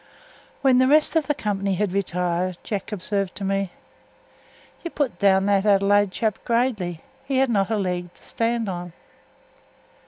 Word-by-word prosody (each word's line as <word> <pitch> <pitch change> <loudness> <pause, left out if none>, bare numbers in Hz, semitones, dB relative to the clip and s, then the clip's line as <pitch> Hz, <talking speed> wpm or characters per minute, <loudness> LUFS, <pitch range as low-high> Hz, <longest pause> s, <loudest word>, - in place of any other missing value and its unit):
When 265 -2 +5
the 255 0 +4
rest 305 +3 +3
of 315 -4 +2
the 295 - +1
company 200 -3 -1
had 205 0 -1
retired, 180 -1 -1
Jack 205 -1 -4
observed 195 -1 -2
to 200 - -6
me: 195 0 0 1.1
"You 340 - -3
put 285 -6 -2
down 195 -1 +4
that 200 -1 +2
Adelaide 205 0 +4
chap 215 +2 -1
gradely; 225 -9 -1 0.2
he 270 -1 -2
had 265 -2 +2
not 195 -3 +1
a 220 - 0
leg 180 -3 -2
to - - -24
stand 230 -1 -1
on." 175 -2 -5
200 Hz, 160 wpm, -23 LUFS, 190-235 Hz, 1.1 s, When